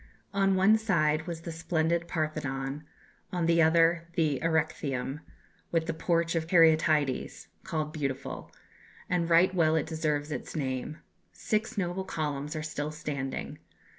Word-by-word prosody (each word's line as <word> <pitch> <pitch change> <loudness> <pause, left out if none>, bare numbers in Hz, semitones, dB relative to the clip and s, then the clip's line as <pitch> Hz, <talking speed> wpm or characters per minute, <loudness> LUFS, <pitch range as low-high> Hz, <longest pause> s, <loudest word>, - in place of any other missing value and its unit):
"On 195 -1 +3
one 200 +4 +5
side 155 -7 +1
was 170 -2 -5
the 165 - -6
splendid 165 +1 0
Parthenon, 145 -3 -3 0.5
on 175 -2 0
the 165 0 +4
other 165 +1 +4
the 150 -5 +1
Erechtheum, 150 -4 -1 0.5
with 165 -1 +1
the 165 - -2
Porch 165 0 0
of 165 -1 -1
Caryatides, 155 -5 +3
called 155 -1 -3
Beautiful, 135 -3 -4 0.6
and 175 -2 +1
right 170 +3 +5
well 160 -3 +3
it 160 - +1
deserves 155 -2 -1
its 145 - -5
name. 135 0 -3 0.4
Six 215 +1 -2
noble 185 0 -1
columns 150 -4 -3
are 155 - -3
still 150 -1 -3
standing. 145 -3 -5
160 Hz, 135 wpm, -29 LUFS, 150-170 Hz, 0.6 s, one